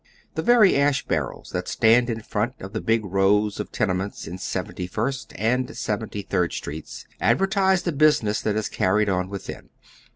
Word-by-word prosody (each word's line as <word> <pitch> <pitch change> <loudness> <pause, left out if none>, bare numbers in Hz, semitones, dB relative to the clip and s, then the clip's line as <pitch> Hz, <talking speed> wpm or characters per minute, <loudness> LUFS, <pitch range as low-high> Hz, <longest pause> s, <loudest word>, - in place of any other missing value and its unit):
The - - -2
very 235 -5 +5
ash 140 -1 +2
baiTels - - -3
tiiat - - -3
stand 120 +2 +4
in 115 -1 -3
front 110 +6 -2
of 95 +2 -9
the 110 - -2
big 110 -1 +1
rows 100 +2 +2
of - - -5
tenements 95 -2 -2
in 90 +3 -7
Seventy 90 0 -4
first 125 +8 -3
and 125 +4 -1
Seventy 105 -1 -3
third 90 -3 0
Streets 75 +2 -7
advertise 190 -1 +2
the 175 - 0
business 145 -8 +3
that 105 - -1
is 110 -1 -1
carried 105 +1 +1
on 90 -1 0
within. 100 -1 -7
110 Hz, 170 wpm, -24 LUFS, 100-130 Hz, -, very